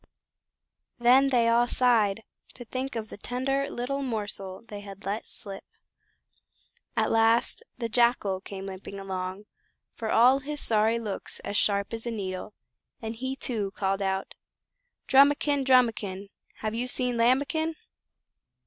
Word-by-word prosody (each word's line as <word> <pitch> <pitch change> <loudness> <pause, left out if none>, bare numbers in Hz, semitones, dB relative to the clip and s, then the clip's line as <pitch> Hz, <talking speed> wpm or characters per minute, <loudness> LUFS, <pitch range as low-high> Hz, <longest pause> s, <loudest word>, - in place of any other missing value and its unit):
Then 255 +3 +5
they 240 -3 +3
all 235 +1 +4
sighed 225 -5 +3 0.3
to 245 - -9
think 255 +3 -4
of 220 -2 -4
the - - -9
tender 270 +4 -1
little 275 +3 -3
morsel 205 -6 -4
they 205 -2 -7
had 200 -1 -11
let 205 +3 -3
slip. 195 -3 -4 1.3
At - - +2
last 225 +1 +3 0.2
the 235 -2 -2
Jackal 230 -5 +2
came 195 -1 -7
limping 195 +1 -7
along, 190 0 -4 0.5
for 220 - -5
all 250 +4 +5
his 295 +2 -5
sorry 220 -1 +2
looks 215 -4 -5
as 205 - -5
sharp 200 +1 +2
as 225 +1 -5
a - - 0
needle, 195 -2 -5 0.4
and 225 0 -5
he 260 +3 -3
too 210 -7 -3
called 195 0 -1
out 190 0 -2 0.7
"Drumikin! 285 +1 +4
Drumikin! 220 -7 +2 0.3
Have 215 0 -2
you 240 +2 -2
seen 250 -1 0
Lambikin?" 280 +7 +2
230 Hz, 140 wpm, -27 LUFS, 200-255 Hz, 1.3 s, Then